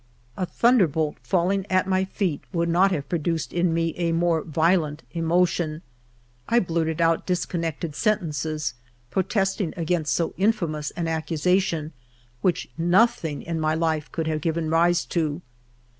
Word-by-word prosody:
A 185 - -2
thunderbolt 170 - +2
falling 190 +1 +1
at 185 0 +2
my 190 0 +1
feet 190 -5 -2
would 170 -2 0
not 180 +4 +4
have 145 -7 -2
produced 165 0 -2
in 175 0 +2
me 165 0 0
a 170 -1 0
more 165 -1 +2
violent 160 -1 +1
emotion; 165 -1 +1 0.7
I 235 +1 +5
blurted 165 -4 -1
out 165 0 +2
discon 180 -1 -1
nected 165 -1 -3
sentences, 155 - -1 0.4
protesting 195 -1 0
against 165 -2 0
so 170 - -1
infamous 170 -8 0
an 170 -1 -1
accusation, 165 0 0 0.5
which 180 -3 0
nothing 175 -3 +2
in 165 -1 -3
my 155 0 +1
life 160 -2 -1
could 165 - -2
have 155 -1 -1
given 160 0 -1
rise 170 +1 +3
to. 160 -1 -2
165 Hz, 145 wpm, -24 LUFS, 160-180 Hz, 0.7 s, I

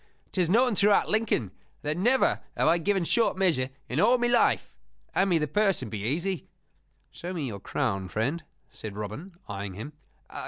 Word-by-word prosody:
'Tis 180 -4 +1
known 240 +5 +4
throughout 205 +1 +3
Lincoln 215 - +1 0.3
that 150 +1 -1
never 245 +9 +2 0.2
have - - +2
I 170 +2 +4
given 195 +2 +1
short 225 +2 +2
measure 160 -9 +2 0.2
in 125 - -2
all 235 +7 +5
my 240 - 0
life. 240 0 +2 0.4
Hand 195 +1 +2
me 175 - +4
the 150 -1 0
purse 200 -4 +1
and 110 - -7
be 105 -3 -4
easy." 165 - -2 0.6
"Show 180 +2 -6
me 160 -6 -3
your 105 -6 -5
crown, 95 0 -2
friend," 135 - -1 0.3
said 105 -2 -8
Robin, 120 - -6
eyeing 100 -2 -5
him. 140 +10 -7
170 Hz, 180 wpm, -27 LUFS, -, 0.6 s, all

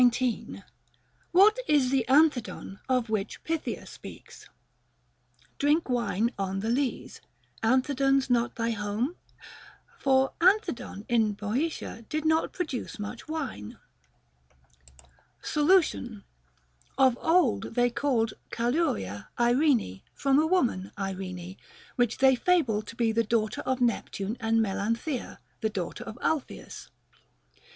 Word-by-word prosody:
What 410 +6 +6
is 275 -4 +3
the 270 -2 +2
Anthedon 270 -8 +2
of 250 -2 +2
which 215 -1 -3
Pythia 325 -1 -3
speaks, - - -12 1.1
Drink 295 +1 +2
wine 235 -2 0
on 195 0 -2
th' 225 +3 0
lees, 270 0 -2 0.4
Anthedon's 270 +3 +2
not 240 -2 +1
thy 230 0 -1
home 225 - -2 0.2
f - - -17 0.6
For 265 -1 +3
Anthedon 335 - +1
in 225 -3 +2
Boeotia 230 +4 -3
did 310 0 -2
not 315 +1 +2
produce 305 -9 -4
much 210 +6 -7
wine. 280 - -5 1.7
Solution. 300 - +2 0.7
Of 260 -2 +5
old 320 - +2
they 245 0 +3
called 240 -4 0 0.2
Calauria 235 - -1
Irene 240 - +2
from 275 0 +3
a 315 - +3
woman 245 - +1
Irene, 185 -2 -5 0.4
which 245 -2 +1
they 265 0 +5
fable 255 -7 +2
to 225 - -11
be 230 -1 +1
the 230 +1 +2
daughter 220 -1 0
of 260 0 0
Nep 240 -3 +1
tune 200 +3 -4
and 225 0 +2
Melanthea, 230 +7 -2 0.2
the 220 - 0
daughter 195 +3 -5
of 225 0 -8
Alpheus. 310 -5 -3
245 Hz, 115 wpm, -28 LUFS, 215-285 Hz, 1.7 s, What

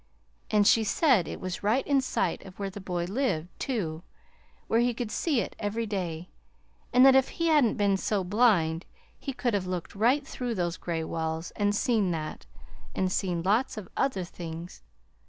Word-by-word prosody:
And 210 -1 +3
she 225 +2 +5
said 235 - +3
it - - -6
was 185 -1 -4
right 220 +6 +1
in 280 -2 +3
sight 260 - -1
of 185 -1 -12
where 195 -1 -3
the 205 - -8
boy 180 -2 -2
lived, 185 - -1
too, 175 - -2 0.6
where 225 - +2
he 240 0 +2
could 235 -2 -4
see 280 0 +1
it - - -6
every 215 +3 -2
day; 180 -5 -4 0.6
and 250 +1 +7
that 270 - +8
if 265 0 +5
he 335 0 -1
hadn't 290 -8 +4
been 200 -1 +2
so 200 0 0
blind 180 -5 +2 0.3
he 275 - -4
could 245 -2 -1
have 190 -3 0
looked 180 -2 -4
right 245 +8 +2
through 245 -2 -3
those 175 -2 -1
gray 165 -2 -3
walls 160 +1 -3
and 205 0 0
seen 220 -4 +2
that, 155 -3 -4 0.5
and 185 -1 0
seen 175 -3 -1
lots 220 +6 +1
of 205 -4 -6
other 225 -9 0
things. 170 - -8
205 Hz, 185 wpm, -28 LUFS, 175-240 Hz, 0.6 s, that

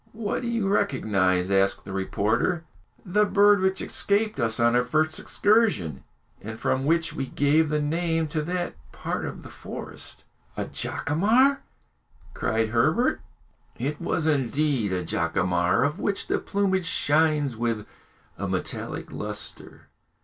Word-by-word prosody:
"What 215 +1 -2
do 240 - -4
you 230 -4 0
recognise?" 95 - +1
asked 95 0 +2
the 95 - -7
reporter. 105 - 0 0.4
"The 205 +3 +3
bird 205 0 +5
which 190 0 +1
escaped 210 -3 0
us 115 -2 0
on 120 0 +4
our 125 - +5
first 155 +5 0
excursion, 205 - +1 0.4
and 110 +2 -7
from 130 +1 0
which 165 +2 +1
we 135 - -3
gave 150 +4 +2
the 150 0 +1
name 165 +2 0
to 155 +1 -1
that 175 +3 -2 0.2
part - - -4
of - - -7
the - - -10
forest." - - -9 0.3
"A - - -1
jacamar!" 235 - +2 0.7
cried 110 +1 0
Herbert. 115 +1 +2 0.6
It 145 +6 -3
was 160 -2 -1
indeed 140 -5 +1
a 90 -1 -2
jacamar, 90 +4 +1
of 150 +6 -1
which 200 -1 -2
the - - 0
plumage 190 -3 0
shines 150 -4 +2
with 115 -2 -2 0.5
a - - -2
metallic - - -4
lustre. 105 -1 -6
150 Hz, 140 wpm, -25 LUFS, -, 0.7 s, bird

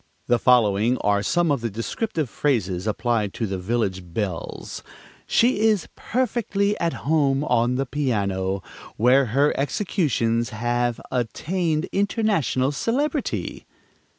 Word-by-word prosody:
The 120 0 +2
following 115 -1 +3
are 100 0 +2
some 170 +8 +1
of 140 -4 0
the 115 - -1
descriptive 150 - -3
phrases 105 -8 -1
applied 110 -1 0
to 115 - -1
village 95 -1 -1
belles: 90 0 -5 0.5
"She 240 -1 +3
is 215 -4 +2
perfectly 215 -4 0
at 170 -2 -2
home 145 -3 +2
on 120 -3 +2
the 135 +1 0
piano, 100 -9 -1 0.3
where 130 +4 +5
her 140 +6 +2
executions 130 - 0
have 120 +2 -1
attained 155 +7 -1
international 200 - +1
celebrity." 275 - -2
125 Hz, 115 wpm, -23 LUFS, 110-170 Hz, 0.5 s, where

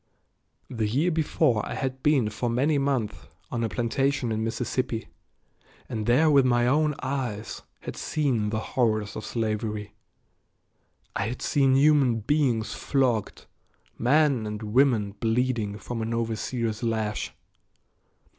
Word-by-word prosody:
The 115 -5 -2
year 145 +11 +1
before 135 -8 +1
I - - -5
had 130 -1 -3
been 135 -8 +2
for 120 +3 -2
many 140 +5 +2
months 135 -6 0 0.4
on 120 -2 -1
a 115 - 0
plantation 125 +2 0
in 110 0 -1
Mississippi, 120 +1 -2 0.8
and 110 -2 -4
there 130 +7 +4
with 140 -2 +6
my 120 -1 +3
own 150 +3 +2
eyes 125 -6 -3 0.2
had - - -6
seen 130 -9 0
the 110 - -1 0.2
horrors 110 -4 +1
of 110 - -5
slavery. 110 -1 -3 1.2
I 100 - 0
had 125 +2 -5
seen 135 -2 +3
human 135 -5 +4
beings 125 -3 +1
flogged; 125 -6 0 0.5
men 135 -2 +2
and 105 +1 -5
women 120 -6 +3
bleeding 115 -3 0
from 115 +3 -5
an 115 +1 -2
overseer's 115 0 -2
lash. 110 -3 -2
120 Hz, 130 wpm, -26 LUFS, 110-135 Hz, 1.2 s, with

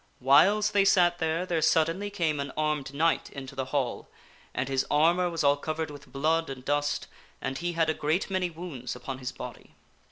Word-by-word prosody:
Whiles 195 +11 +5
they 200 -1 +4
sat 175 -3 +4
there, 160 +2 0
there 170 -3 0
suddenly 165 +5 +2
came 165 -7 -1
an 140 -1 -3
armed 150 -3 -1
knight 160 +4 +1
into 135 -1 -8
the 135 -1 -3
Hall, 130 -2 -2 0.4
and 125 - -2
his 135 -1 +1
armor 170 +4 +3
was 165 -2 -2
all 140 0 +4
covered 155 +1 -3
with 145 -1 -12
blood 160 +3 +1
and 130 -1 -8
dust, 145 0 0 0.3
and 135 - -3
he 175 0 -2
had 165 -1 +1
a 155 - +2
great 155 +5 0
many 185 -2 -1
wounds 155 -8 -6
upon 130 +2 -6
his 125 -1 -4
body. - - -10
155 Hz, 195 wpm, -28 LUFS, 140-175 Hz, 0.4 s, Whiles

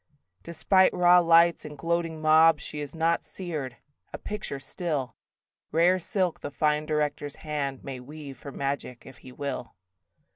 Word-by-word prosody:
Despite 185 +3 +2
raw 180 0 +6
lights 170 0 +4
and 150 -1 -9
gloating 165 0 -2
mobs 155 -1 +5
She 150 - -5
is 145 +3 -7
not 165 +1 +1
seared: 150 -9 -6 0.3
a - - -6
picture 210 -9 -5
still: 140 -1 -4 0.6
Rare 175 +4 +3
silk 180 0 -1
the - - -5
fine 150 +1 0
director's 145 -1 -2
hand 140 -4 -4
May 135 -2 -6
weave 140 0 -10
for 140 - -8
magic 135 -3 -4
if 130 - -12
he 130 - -13
will. 130 -4 -5
155 Hz, 150 wpm, -27 LUFS, 140-170 Hz, 0.6 s, raw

